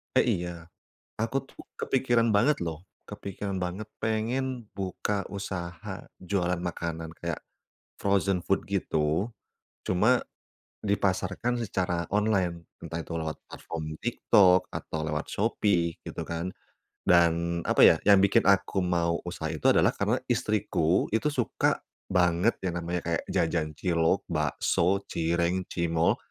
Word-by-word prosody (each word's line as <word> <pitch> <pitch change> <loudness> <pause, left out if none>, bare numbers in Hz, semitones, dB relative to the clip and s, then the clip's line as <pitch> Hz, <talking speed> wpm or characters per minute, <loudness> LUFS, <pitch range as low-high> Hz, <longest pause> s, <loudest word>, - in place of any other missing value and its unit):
Eh, - - +5 0.2
iya, 85 -2 -7 0.5
aku 115 +4 0
tuh - - -14 0.2
kepikiran 120 -4 +2
banget 125 +9 +4
loh, 80 -2 -4 0.2
kepikiran 100 -1 -5
banget 90 +4 -4 0.2
pengen 120 +3 -1
buka 95 +1 -2 0.2
usaha, 90 -3 -5 0.2
jualan 90 -1 -1
makanan 80 -1 -5
kayak 85 -2 -3 0.6
frozen 100 -2 +1
food, 95 - +2
gitu. 90 +1 0 0.5
Cuma 110 +8 +3 0.6
dipasarkan 100 +4 0
secara 90 -5 -1
online, 95 -5 +1 0.2
entah 85 - -5
itu - - -7
lewat 80 -1 -4
platform 75 -1 -6
TikTok 100 -6 +4
atau 80 - -4
lewat 75 +1 -2
Shopee, 100 -5 +1
gitu - - -5
kan. 85 +2 -3 0.6
Dan, 85 0 +3
apa - - +2
ya, - - +8
yang 100 -1 +7
bikin 100 +1 +4
aku 95 -1 +3
mau 85 -1 +1
usaha 85 -2 -4
itu 80 - +3
adalah - - +4
karena - - +1
istriku 80 +3 +1
itu 115 +7 +2
suka 125 -6 0 0.3
banget 90 +4 +3
yang 90 -2 -1
namanya 85 +1 -2
kayak 85 - 0
jajan 80 -2 0
cilok, 85 +1 +2
bakso, 85 +3 +1
cireng, 85 +2 0
cimol, 85 -1 +2
90 Hz, 125 wpm, -28 LUFS, 85-100 Hz, 0.6 s, ya